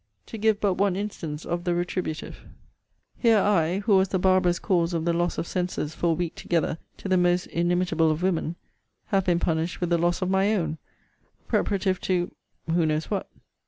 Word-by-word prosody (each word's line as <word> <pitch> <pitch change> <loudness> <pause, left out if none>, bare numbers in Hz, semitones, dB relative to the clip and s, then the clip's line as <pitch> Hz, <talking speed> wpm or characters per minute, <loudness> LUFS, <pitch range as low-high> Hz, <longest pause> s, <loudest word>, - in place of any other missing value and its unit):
To 225 - -8
give 215 -1 +2
but 195 -3 0
one 200 -2 +2
instance 165 -7 -5
of 175 0 -2
the 175 -1 0
retributive 175 -2 -3 0.8
here 230 -3 +5
I, 190 -2 +2
who 205 -1 +4
was 190 0 +3
the 190 - 0
barbarous 185 -1 +3
cause 175 -3 +1
of 165 -1 -1
the 170 - +2
loss 175 +1 0
of - - -2
senses 180 -4 -2
for 170 - -1
a - - +4
week 170 0 -2
together 165 -1 -1 0.2
to - - -7
the 185 -1 +3
most 175 0 +2
inimitable 175 -1 +1
of 155 +3 -1
women, 170 -2 0 0.5
have 195 -2 +2
been 175 -1 +2
punished 165 0 -1
with 175 -1 -2
the 170 - +3
loss 175 +2 +1
of 185 - -1
my 195 +3 +3
own 160 -5 -2 0.7
preparative 190 -2 0
to 180 -1 0 0.4
who 165 -1 +2
knows 155 +3 -1
what? 200 - -2
175 Hz, 195 wpm, -26 LUFS, 170-190 Hz, 0.8 s, here